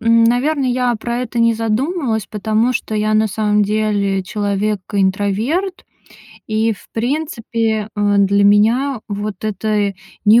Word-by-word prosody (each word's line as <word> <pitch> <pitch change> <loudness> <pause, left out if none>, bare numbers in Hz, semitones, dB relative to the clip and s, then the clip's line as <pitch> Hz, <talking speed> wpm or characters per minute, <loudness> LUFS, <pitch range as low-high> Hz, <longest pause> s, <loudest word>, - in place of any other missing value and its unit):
н 230 0 +4
наверное, 260 +4 +1
я 245 -1 +1
про 235 +2 -3
это 245 -1 -3
не 230 0 +4
задумалась, 225 - -1
потому 220 +3 0
что 240 -3 -3
я 215 0 +1
на 215 0 +3
самом 210 0 +1
деле 205 -2 0
человек-интроверт. 205 - -1 0.6
И, 220 +1 +1
в 200 - -13
принципе, 230 -4 -1
э, 205 -1 +1
для 200 0 +3
меня 230 +6 +3
вот 205 -1 -5
это 210 -1 0 0.3
не 220 +3 +7
220 Hz, 135 wpm, -18 LUFS, 205-240 Hz, 0.6 s, не